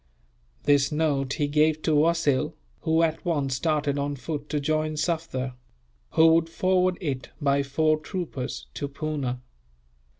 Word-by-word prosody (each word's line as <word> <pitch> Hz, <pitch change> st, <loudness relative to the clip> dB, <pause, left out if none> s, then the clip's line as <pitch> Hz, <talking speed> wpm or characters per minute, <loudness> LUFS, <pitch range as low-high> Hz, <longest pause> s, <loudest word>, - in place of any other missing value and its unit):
This 145 Hz, 0 st, +3 dB
note 145 Hz, -3 st, 0 dB
he 145 Hz, -, 0 dB
gave 155 Hz, +1 st, +2 dB
to 160 Hz, -, +1 dB
Wasil, 150 Hz, -3 st, +2 dB, 0.2 s
who 160 Hz, +1 st, +2 dB
at 160 Hz, -1 st, 0 dB
once 145 Hz, -6 st, 0 dB
started 145 Hz, -1 st, 0 dB
on 145 Hz, 0 st, -1 dB
foot 145 Hz, +2 st, -5 dB
to 150 Hz, -, 0 dB
join 155 Hz, +1 st, 0 dB
Sufder; 150 Hz, -6 st, -2 dB, 0.6 s
who 160 Hz, -, +6 dB
would 165 Hz, 0 st, +2 dB
forward 185 Hz, +1 st, +2 dB
it, 140 Hz, -8 st, -3 dB
by 140 Hz, -2 st, +2 dB
four 155 Hz, +3 st, +1 dB
troopers, 155 Hz, -6 st, -5 dB
to 145 Hz, -, -3 dB
Poona. 140 Hz, -4 st, -3 dB
150 Hz, 140 wpm, -26 LUFS, 140-160 Hz, 0.6 s, who